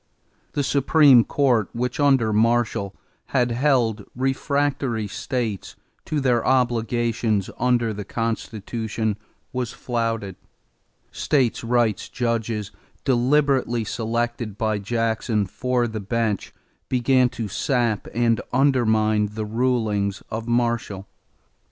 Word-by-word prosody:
The 145 - 0
Supreme 140 -2 +5
Court, 120 -8 +1
which, 125 +2 -2
under 135 -7 +3
Marshall, 110 -3 +1 0.3
had 125 -3 +1
held 120 -4 +1
refractory 135 -3 0
states 120 -3 -4 0.3
to 155 - -1
their 125 -4 +2
obligations 120 -4 +1
under 120 -2 +2
the 105 0 -5
Constitution, 110 0 -3 0.4
was 125 -2 -3
flouted; 115 -5 -3 0.7
states' 130 -7 0
rights 115 -2 +1
judges, 115 -3 -2 0.3
deliberately 130 -2 +2
selected 115 -1 -3
by 110 -1 0
Jackson 110 0 0
for 125 +5 -1
the 110 -1 -5
bench, 110 0 -2 0.4
began 125 0 +3
to 115 - -2
sap 120 0 0
and 115 0 +1
undermine 110 -5 +2
the 110 0 -3
rulings 110 -4 0
of 110 +1 -4
Marshall. 115 -5 -1
115 Hz, 100 wpm, -23 LUFS, 110-125 Hz, 0.7 s, Supreme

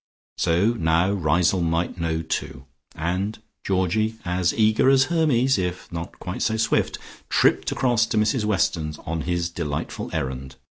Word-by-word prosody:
So 90 +6 +3
now 85 -2 +2
Riseholme 85 0 +2
might 85 +2 -1
know, 80 0 -1
too, 65 -4 -4 0.3
and 90 +6 -2 0.3
Georgie, 100 +4 0
as 90 0 +1
eager 110 +3 +3
as 135 -1 +5
Hermes, 135 - +3
if 90 0 -4
not 85 +1 -6
quite 90 -1 -6
so 110 - +1
swift, 115 - +1 0.3
tripped - - +2
across 120 -3 +2
to 110 - -2
Mrs 110 +2 +2
Weston's, 85 -7 0
on 80 0 -2
his 85 +1 -1
delightful 75 -4 -4
errand. 65 -3 -4
90 Hz, 145 wpm, -23 LUFS, 80-110 Hz, 0.3 s, as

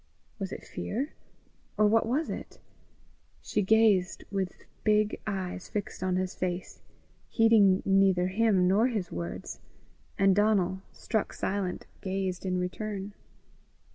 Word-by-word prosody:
Was 195 -1 -4
it - - -7
fear? 270 +8 -4 0.6
or 215 - +5
what 225 +2 +3
was 290 +7 0
it? - - -7 0.8
She 210 - -1
gazed 205 -3 +3
with 190 -2 -3 0.2
big 215 -1 +2
eyes 185 -3 -4
fixed 210 -2 -4
on 185 -1 0
his 185 0 -1
face, 180 0 -4 0.5
heeding 215 -5 +5
neither 195 -2 +4
him 195 -2 +3
nor 205 +6 +4
his 210 -8 -3
words, 85 0 -5 0.6
and 195 -1 +4
Donal, 195 -3 +2
struck 220 -3 -2
silent, 190 -2 -2 0.2
gazed 190 -1 -2
in 185 0 0
return. 200 +2 -4
195 Hz, 125 wpm, -29 LUFS, 185-215 Hz, 0.8 s, or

